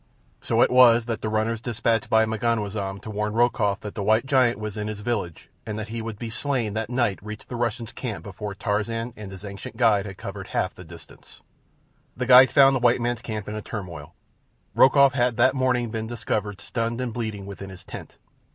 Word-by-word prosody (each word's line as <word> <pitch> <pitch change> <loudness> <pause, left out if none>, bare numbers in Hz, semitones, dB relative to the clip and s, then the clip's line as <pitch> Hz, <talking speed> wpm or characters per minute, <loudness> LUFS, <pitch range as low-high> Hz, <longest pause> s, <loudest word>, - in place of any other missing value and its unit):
So - - +3
it - - +2
was 120 -2 +6
that 115 -2 -3
the 110 - -2
runners 110 +1 -1
dispatched 115 -1 0
by 110 0 +4
M'ganwazam 105 -3 -2
to 110 - -7
warn 105 0 -2
Rokoff 110 -4 +1
that 105 - -7
the 105 - -4
white 110 +4 +2
giant 130 -4 +3
was 105 -1 -5
in 105 -1 -3
his 105 -1 -5
village 105 -8 -4
and 105 -1 -5
that 110 0 -5
he 115 0 -4
would 110 -2 -6
be 115 0 -6
slain 120 -4 -1
that 110 0 -3
night 120 -5 0
reached 105 0 -9
the 125 - -5
Russian's 120 -1 -2
camp 115 -6 -5
before 100 0 -6
Tarzan 115 +4 -2
and 105 -3 -9
his 95 +1 -9
ancient 100 +2 -8
guide 105 -4 +3
had 95 - -9
covered - - -7
half 90 - -1
the 90 - -12
distance. 85 -1 -15 0.7
The 125 - -1
guides 130 +1 +8
found 135 -1 +6
the - - +1
white 120 0 +3
man's 120 -1 -1
camp 110 -4 -5
in 105 - -4
a 110 - -4
turmoil. 85 -7 -7 0.6
Rokoff 140 0 +6
had 120 -3 +1
that 130 +2 +4
morning 125 -3 0
been 110 -1 -3
discovered 105 -3 -3
stunned 115 +1 -3
and 125 -3 -3
bleeding 110 -4 -4
within 100 0 -8
his 95 -1 -11
tent. - - -10
110 Hz, 210 wpm, -24 LUFS, 105-120 Hz, 0.7 s, guides